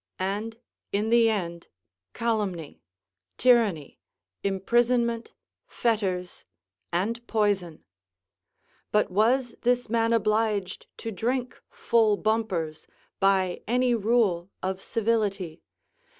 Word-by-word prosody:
And, 210 Hz, +4 st, -3 dB, 0.3 s
in 210 Hz, +3 st, 0 dB
the 235 Hz, -1 st, +5 dB
end, 170 Hz, -5 st, -3 dB, 0.5 s
calumny, 205 Hz, -9 st, -2 dB, 0.6 s
tyranny, 225 Hz, -, +2 dB, 0.4 s
imprisonment, 235 Hz, +4 st, +1 dB, 0.3 s
fetters, 190 Hz, -6 st, -1 dB, 0.5 s
and 230 Hz, +7 st, -2 dB
poison. 200 Hz, -7 st, 0 dB, 1.1 s
But 210 Hz, -2 st, +2 dB
was 235 Hz, +5 st, +2 dB
this 245 Hz, -1 st, +1 dB
man 230 Hz, -1 st, +2 dB
obliged 215 Hz, -3 st, 0 dB
to 225 Hz, -, -5 dB
drink 245 Hz, +5 st, -2 dB
full 220 Hz, -3 st, +2 dB
bumpers 190 Hz, -9 st, -1 dB, 0.3 s
by 190 Hz, -2 st, +2 dB
any 245 Hz, +2 st, +2 dB
rule 210 Hz, -6 st, +1 dB
of 190 Hz, 0 st, -2 dB
civility? 205 Hz, -7 st, -1 dB
215 Hz, 90 wpm, -26 LUFS, 190-230 Hz, 1.1 s, the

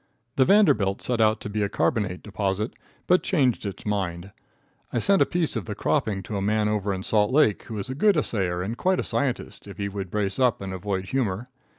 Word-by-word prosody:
The 130 Hz, -, +4 dB
Vanderbilt 140 Hz, -, +4 dB
set 120 Hz, -2 st, +1 dB
out 110 Hz, 0 st, +3 dB
to -, -, -5 dB
be 105 Hz, +1 st, -2 dB
a 100 Hz, -, 0 dB
carbonate 100 Hz, -4 st, -1 dB
deposit, 100 Hz, +1 st, -2 dB, 0.3 s
but 180 Hz, 0 st, +4 dB
changed 130 Hz, -, +1 dB
its 100 Hz, -, -7 dB
mind. 95 Hz, -3 st, -2 dB, 0.6 s
I -, -, -2 dB
sent 195 Hz, -, +3 dB
a -, -, +5 dB
piece 170 Hz, -5 st, -1 dB
of 110 Hz, -6 st, -3 dB
the -, -, -5 dB
cropping 100 Hz, -3 st, 0 dB
to 105 Hz, +2 st, -4 dB
a -, -, -2 dB
man 105 Hz, +1 st, +1 dB
over 105 Hz, -1 st, 0 dB
in 95 Hz, -1 st, -3 dB
Salt 105 Hz, +1 st, +2 dB
Lake, 135 Hz, -7 st, +3 dB
who 110 Hz, -, -6 dB
is 100 Hz, -, -4 dB
a 130 Hz, -, -4 dB
good 195 Hz, +6 st, +3 dB
assayer 95 Hz, -10 st, 0 dB
and 110 Hz, +5 st, -3 dB
quite 185 Hz, +7 st, +1 dB
a -, -, 0 dB
scientist, 130 Hz, -6 st, -2 dB
if 100 Hz, -, -10 dB
he 100 Hz, -1 st, -2 dB
would 100 Hz, -2 st, -5 dB
brace 100 Hz, +1 st, -2 dB
up 125 Hz, -4 st, +3 dB
and 95 Hz, -1 st, -5 dB
avoid 95 Hz, 0 st, -3 dB
humor. 120 Hz, -3 st, -1 dB
105 Hz, 225 wpm, -25 LUFS, 95-125 Hz, 0.6 s, a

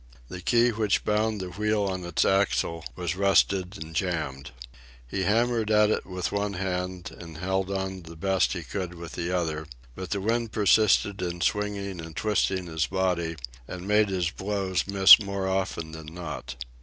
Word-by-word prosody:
The 90 Hz, -, -7 dB
key 120 Hz, +5 st, +3 dB
which 110 Hz, -2 st, 0 dB
bound 105 Hz, 0 st, +1 dB
the 90 Hz, -1 st, -5 dB
wheel 105 Hz, +2 st, 0 dB
on 95 Hz, -2 st, -2 dB
its 85 Hz, -2 st, +1 dB
axle 85 Hz, -4 st, +1 dB
was 90 Hz, +3 st, -2 dB
rusted 95 Hz, 0 st, +2 dB
and 80 Hz, +1 st, -8 dB
jammed. 80 Hz, -7 st, -2 dB, 0.6 s
He 95 Hz, -, -3 dB
hammered 115 Hz, 0 st, +2 dB
at 105 Hz, 0 st, +4 dB
it -, -, -1 dB
with 90 Hz, -2 st, -3 dB
one 100 Hz, 0 st, -1 dB
hand 90 Hz, -1 st, -3 dB
and 80 Hz, -3 st, -9 dB
held 95 Hz, +2 st, -1 dB
on 95 Hz, -1 st, -3 dB
the 85 Hz, 0 st, -11 dB
best 95 Hz, +3 st, +1 dB
he 90 Hz, -3 st, -5 dB
could 90 Hz, +1 st, -5 dB
with 85 Hz, -1 st, -8 dB
the 85 Hz, 0 st, -3 dB
other, 80 Hz, -3 st, -2 dB, 0.3 s
but 95 Hz, +5 st, -7 dB
the 100 Hz, -, -1 dB
wind 115 Hz, +2 st, -1 dB
persisted 105 Hz, -1 st, +3 dB
in 85 Hz, -1 st, -3 dB
swinging 100 Hz, 0 st, -1 dB
and 80 Hz, -1 st, -9 dB
twisting 95 Hz, -3 st, 0 dB
his 80 Hz, -2 st, -1 dB
body, 90 Hz, -3 st, 0 dB, 0.3 s
and 90 Hz, +1 st, -7 dB
made 105 Hz, 0 st, +3 dB
his 90 Hz, -3 st, 0 dB
blows 95 Hz, -2 st, -2 dB
miss 100 Hz, +1 st, +9 dB
more 100 Hz, -1 st, -3 dB
often 95 Hz, -4 st, -2 dB
than 80 Hz, -1 st, -9 dB
not. 80 Hz, -5 st, -6 dB
95 Hz, 175 wpm, -27 LUFS, 85-100 Hz, 0.6 s, miss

